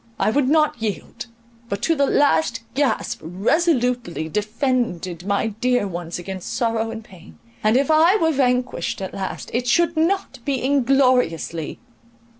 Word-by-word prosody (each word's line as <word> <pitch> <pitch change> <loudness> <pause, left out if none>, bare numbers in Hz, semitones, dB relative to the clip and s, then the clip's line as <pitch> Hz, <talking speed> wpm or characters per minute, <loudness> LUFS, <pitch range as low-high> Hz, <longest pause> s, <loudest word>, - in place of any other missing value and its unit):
I - - +1
would 270 +1 +2
not 305 -6 +2
yield, 210 +1 -4 0.4
but 200 +2 -4
to 330 - +2
the 280 -2 +2
last 235 - +2
gasp 280 0 0
resolutely 235 - 0
defended 210 - -2
my 200 +2 +1
dear 245 +1 0
ones 175 -2 -5
against 185 +1 -6
sorrow 225 -1 0
and 225 0 -7
pain; 170 - -16 0.3
and 215 +3 +4
if 280 +3 +2
I 325 +5 +5
were 325 -6 +2
vanquished 250 - 0
at 190 -1 -5
last, 190 -1 -5
it 245 +1 -1
should 335 +6 +2
not 325 -4 0
be 275 -1 -1
ingloriously. 255 - +1
240 Hz, 145 wpm, -22 LUFS, 190-280 Hz, 0.4 s, I